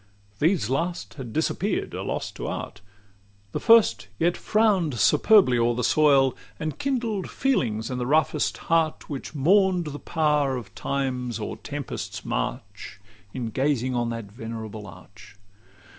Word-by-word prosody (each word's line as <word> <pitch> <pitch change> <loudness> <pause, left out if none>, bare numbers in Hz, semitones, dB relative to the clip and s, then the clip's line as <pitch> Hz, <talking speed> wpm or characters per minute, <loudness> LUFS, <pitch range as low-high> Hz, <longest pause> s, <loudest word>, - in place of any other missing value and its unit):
These 160 - +2
last 170 +8 -2
had 130 -5 -8
disappear'd 170 - -1
a - - -4
loss - - -3
to - - -6
art: 105 - -5 0.7
The - - -2
first 210 - +5
yet 175 +6 +2
frown'd 200 - +2
superbly 185 - +5
o'er 120 0 +2
the 125 - -2
soil, 135 0 +4 0.2
And 155 -2 -4
kindled 235 -8 -1
feelings 115 - 0
in 125 - -3
the 125 - -2
roughest 155 +3 +1
heart, 165 -2 0
Which 140 +2 -6
mourn'd 180 +4 +3
the 145 - -6
power 150 -5 +1
of 105 -5 -9
time's 125 -2 -2
or - - -4
tempest's - - -6
march, - - -4 0.3
In 120 -2 -4
gazing 130 -1 0
on 120 -1 0
that 115 -3 -6
venerable 110 -1 -7
arch. 95 +4 -14
135 Hz, 145 wpm, -25 LUFS, 115-170 Hz, 0.7 s, first